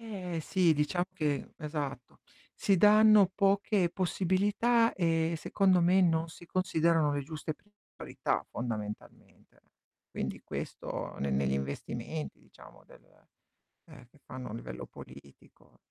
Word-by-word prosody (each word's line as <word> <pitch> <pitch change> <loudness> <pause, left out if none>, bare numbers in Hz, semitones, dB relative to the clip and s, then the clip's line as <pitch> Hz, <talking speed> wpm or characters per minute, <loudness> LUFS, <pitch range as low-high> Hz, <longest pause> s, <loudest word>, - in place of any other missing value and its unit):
Eh 185 -7 -5
sì, 175 0 +2
diciamo 175 +5 0
che 150 -3 -2
esatto, 145 -5 -5 0.4
si 195 -2 +2
danno 210 0 +7
poche 195 -2 +2
possibilità, 205 +6 +1
e 165 -2 +1
secondo 185 +2 +2
me 180 +3 +4
non 165 -2 +2
si 175 +1 -13
considerano 165 -4 +2
le 145 -1 -2
giuste 155 +1 -5 0.4
priorità, - - -2
fondamentalmente. 105 -3 -7 0.5
Quindi - - -4
questo - - -6
ne 70 0 -1
negli 65 0 +1
investimenti, 115 - -4
diciamo, - - -17
del - - -18 0.9
ehm, 130 -5 -14
che 140 - -25
fanno 130 -2 -8
a - - -6
livello 60 - -7
politico. 70 +1 -16
165 Hz, 120 wpm, -30 LUFS, 135-190 Hz, 0.9 s, danno